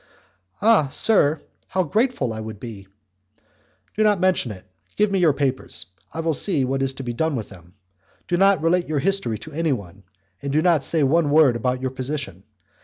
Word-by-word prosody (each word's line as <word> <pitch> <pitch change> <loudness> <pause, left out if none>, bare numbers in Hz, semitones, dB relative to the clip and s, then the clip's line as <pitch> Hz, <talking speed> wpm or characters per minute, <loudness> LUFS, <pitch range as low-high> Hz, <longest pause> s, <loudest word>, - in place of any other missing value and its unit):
"Ah, 220 -9 +5
sir! 155 -3 +2 0.2
how 185 0 0
grateful 215 - 0
I 110 - -6
would 110 -1 -7
be!" 105 -5 -9 1.1
"Do 215 - -1
not 210 -3 +3
mention 180 -10 +1
it. 95 -3 -11 0.3
Give 210 -1 +2
me 195 - +1
your 170 -4 +4
papers, 135 -2 -2 0.3
I 165 - -4
will 165 0 0
see 145 -3 +2
what 135 +1 -1
is 135 0 -1
to 135 - -7
be 120 -1 -4
done 160 +5 -1
with 115 -4 -5
them. 90 -2 -16 0.5
Do 175 - 0
not 195 -1 +3
relate 175 +2 +2
your 155 - -1
history 180 - 0
to 155 - -11
anyone, 120 - -3 0.4
and 140 - -4
do 155 +3 +2
not 170 -6 +3
say 160 +1 +2
one 150 +2 +2
word 145 -4 +5
about 125 +2 -1
your 130 - -1
position. 130 - -5
145 Hz, 190 wpm, -22 LUFS, 125-175 Hz, 1.1 s, Ah